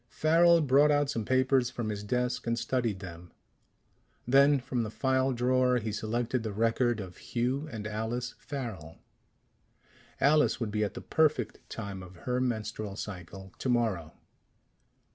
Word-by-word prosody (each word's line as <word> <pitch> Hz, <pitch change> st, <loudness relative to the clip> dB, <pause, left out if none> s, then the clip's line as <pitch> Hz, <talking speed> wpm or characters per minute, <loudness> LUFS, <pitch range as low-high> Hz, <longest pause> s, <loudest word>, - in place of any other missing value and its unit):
Farrel 165 Hz, +6 st, +4 dB
brought 145 Hz, +1 st, +5 dB
out 145 Hz, -1 st, +2 dB
some 115 Hz, -5 st, -3 dB
papers 130 Hz, 0 st, +2 dB
from 120 Hz, -3 st, -4 dB
his 105 Hz, -1 st, -4 dB
desk 125 Hz, +3 st, -1 dB
and 115 Hz, 0 st, +1 dB
studied 115 Hz, -4 st, -1 dB
them. 85 Hz, -2 st, -10 dB, 1.0 s
Then, 140 Hz, +2 st, +5 dB
from 125 Hz, -1 st, -2 dB
the 110 Hz, -, -3 dB
file 130 Hz, +3 st, +1 dB
drawer, 125 Hz, +1 st, +2 dB
he 110 Hz, -2 st, -3 dB
selected 115 Hz, +4 st, -1 dB
the 110 Hz, -1 st, -4 dB
record 115 Hz, +2 st, +1 dB
of 95 Hz, -3 st, -8 dB
Hugh 130 Hz, +6 st, -2 dB
and 110 Hz, -3 st, -6 dB
Alice 110 Hz, +4 st, -3 dB
Farrel. 110 Hz, -, -6 dB, 1.2 s
Alice 150 Hz, +2 st, +3 dB
would 115 Hz, -4 st, -2 dB
be 105 Hz, +1 st, 0 dB
at 100 Hz, -2 st, -3 dB
the -, -, -6 dB
perfect 155 Hz, -7 st, +1 dB
time 100 Hz, -4 st, -6 dB
of 90 Hz, 0 st, -12 dB
her 125 Hz, 0 st, 0 dB
menstrual 110 Hz, -4 st, -3 dB
cycle 95 Hz, -2 st, -8 dB
tomorrow.... 110 Hz, -11 st, 0 dB
120 Hz, 145 wpm, -29 LUFS, 105-130 Hz, 1.2 s, brought